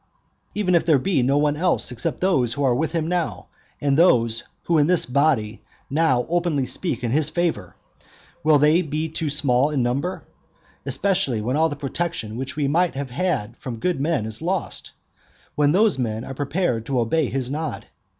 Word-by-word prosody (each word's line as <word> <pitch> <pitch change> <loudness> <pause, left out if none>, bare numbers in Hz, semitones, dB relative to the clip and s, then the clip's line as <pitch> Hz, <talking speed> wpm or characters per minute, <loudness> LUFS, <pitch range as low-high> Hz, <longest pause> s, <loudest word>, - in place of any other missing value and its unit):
Even 200 -3 +1
if 170 - +4
there 160 -4 +4
be 170 +2 +1
no 135 +3 +2
one 145 0 +2
else 170 -5 0
except 120 - -3
those 135 -11 +2
who 145 - -2
are 130 -3 +3
with 155 +7 -1
him 165 -2 -1
now, 175 0 -2 0.3
and 145 0 +1
these 115 -9 +3 0.2
who 165 -2 +2
in 145 - +3
this 180 -1 +3
body 125 -5 +1 0.3
now 135 -5 +2
openly 170 -5 0
speak 130 0 -2
in 120 - -1
his 150 +2 +2
favour, 165 - -2 0.7
will 155 -1 +5
they 150 +4 +4
be 155 -1 -2
too 155 0 -3
small 140 -2 +2
in 140 -5 0
number? 140 +10 -2 0.6
especially 175 - 0
when 120 +5 -1
all 160 +2 +3
the 145 - -4
protection 140 -5 -4
which 135 +3 -5
we 145 -2 0
might 170 +2 +1
have 135 -2 -4
had 130 - -1
from 120 -3 -6
good 170 +4 -1
men 150 -7 0
is 110 +3 -7
lost, 180 +2 -3
and - - -28
when 145 -1 +2
those 200 -2 +3
men 110 -2 -2
are 135 - -6
prepared 140 -3 -1
to 135 -2 0
obey 130 +5 +1
his 130 0 -3
nod? 155 +2 -4
145 Hz, 190 wpm, -23 LUFS, 125-165 Hz, 0.7 s, will